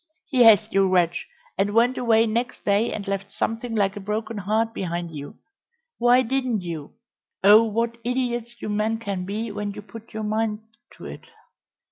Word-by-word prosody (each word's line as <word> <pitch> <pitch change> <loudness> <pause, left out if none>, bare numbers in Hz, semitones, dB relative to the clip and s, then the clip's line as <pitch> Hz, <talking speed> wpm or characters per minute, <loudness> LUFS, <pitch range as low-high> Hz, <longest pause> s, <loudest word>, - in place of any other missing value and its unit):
"Yes, 225 -7 +6
you 195 -1 +3
wretch, 175 -2 +1 0.3
and 205 +2 +1
went 240 +3 +4
away 230 -2 +3
next 235 +2 -3
day 205 +3 +2
and 200 -2 -5
left 195 0 -3
something 225 +1 -3
like 200 -2 +1
a - - -5
broken 215 +3 -3
heart 220 +4 0
behind 170 -3 -4
you! 145 -2 -8 0.6
Why 245 +2 +5
didn't 255 -3 -1
you 165 -4 -7 0.5
Oh 210 +3 +8
what 230 +2 -2
idiots 240 -1 -2
you - - -3
men 215 +2 0
can 200 -5 -4
be 215 +3 -3
when 205 0 -4
you 205 - -9
put 220 +3 -12
your 220 -1 -5
minds 215 0 -1 0.3
to - - -11
it!" - - -9
215 Hz, 170 wpm, -24 LUFS, 200-230 Hz, 0.6 s, Oh